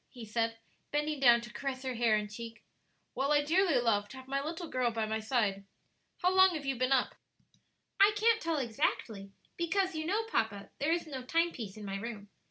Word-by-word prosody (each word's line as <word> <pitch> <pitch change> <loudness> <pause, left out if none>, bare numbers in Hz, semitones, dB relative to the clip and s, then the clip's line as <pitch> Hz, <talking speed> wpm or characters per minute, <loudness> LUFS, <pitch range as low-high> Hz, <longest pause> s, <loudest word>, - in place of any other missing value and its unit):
he 240 -3 -10
said, 225 +1 -1 0.3
bending 295 0 -1
down 240 -3 +6
to 235 0 -10
caress 270 -1 -4
her 260 -1 -2
hair 230 -2 +3
and 210 -1 -2
cheek. 230 +1 -8 0.5
"Well, 275 +3 0
I 290 0 +4
dearly 340 +1 +3
love 205 -4 +1
to 260 - -10
have 260 0 -11
my 275 +1 -1
little 330 +3 -5
girl 255 -4 0
by 225 -1 -2
my 220 +1 -2
side. 215 -4 0 0.6
How 365 +1 +4
long 375 -1 +6
have 295 -3 -5
you 270 -1 0
been 255 +2 0
up?" 265 -2 +2 0.9
"I 400 +1 +7
can't 455 +2 +3
tell 330 -1 -1
exactly; 220 -5 -2 0.3
because, 370 +2 0
you 315 0 -3
know, 420 +5 +1
papa, 205 - -2
there 290 +3 +1
is 340 0 0
no 275 -5 -6
time 330 +6 +1
piece 215 -8 -7
in 210 - -8
my 195 0 -3
room. 205 -1 -7
260 Hz, 210 wpm, -32 LUFS, 225-320 Hz, 0.9 s, I